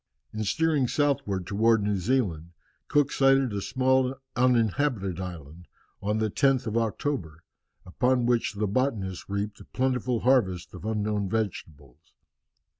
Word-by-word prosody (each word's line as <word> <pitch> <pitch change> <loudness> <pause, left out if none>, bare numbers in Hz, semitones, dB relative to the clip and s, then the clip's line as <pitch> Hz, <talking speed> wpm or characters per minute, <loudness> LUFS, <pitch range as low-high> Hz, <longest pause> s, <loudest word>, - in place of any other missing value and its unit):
In 110 0 -3
steering 155 +2 +1
southwards 120 -11 0
towards 110 +3 +2
New 100 -1 0
Zealand, 90 -7 -1 0.3
Cook 145 -1 +2
sighted 135 -3 +3
a 100 - -2
small 130 +2 +1 0.2
uninhabited 120 - +1
island 85 -2 -8 0.3
on 105 +2 0
the 110 -1 0
10th 135 0 +2
of 110 -1 -3
October, 110 - -2 0.4
upon 125 +6 +1
which 120 -2 +1
the 105 +1 -1
botanists 100 -5 -2
reaped 100 +1 -3
a - - -11
plentiful 125 -2 -1
harvest 100 -9 +1
of 90 +2 -9
unknown 105 -2 -1
vegetables. 80 - -5
110 Hz, 130 wpm, -27 LUFS, 95-130 Hz, 0.4 s, sighted